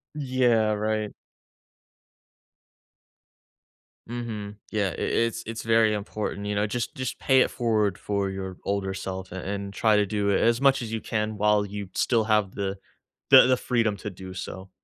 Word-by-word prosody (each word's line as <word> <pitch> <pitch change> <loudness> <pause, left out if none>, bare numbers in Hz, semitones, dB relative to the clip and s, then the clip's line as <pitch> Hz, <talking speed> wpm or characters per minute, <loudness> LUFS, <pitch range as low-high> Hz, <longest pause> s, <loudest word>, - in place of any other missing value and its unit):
Yeah, 125 -6 +2
right. 105 0 -1 3.0
Mhm. 110 -4 -5 0.2
Yeah, 105 -3 +1
I - - -6
it's 115 0 0
it's 115 +1 -5
very 115 -1 +4
important, 105 0 -4
you 105 - -1
know? 105 - +1
Just 120 +6 -3
just 130 -3 -4
pay 130 -1 +4
it - - +2
forward 110 -6 +1
for 100 -1 -1
your 95 -1 -6
older 100 -1 -1
self 95 -1 -6
and 95 - -5
and 100 0 -4
try 110 +1 +3
to 105 - +3
do 100 0 -1
it 100 - +3
as 115 +2 +2
much 135 -2 +4
as 115 -1 -5
you 110 - -2
can 105 -1 -2
while 105 0 +3
you 100 -1 -6
still 115 -3 +2
have 105 -3 +1
the 100 -1 -3 0.5
the - - +9
the 130 - +3
freedom 115 -5 0
to 105 - -5
do 95 -1 -9
so. 95 +1 -7
105 Hz, 170 wpm, -26 LUFS, 100-115 Hz, 3.0 s, the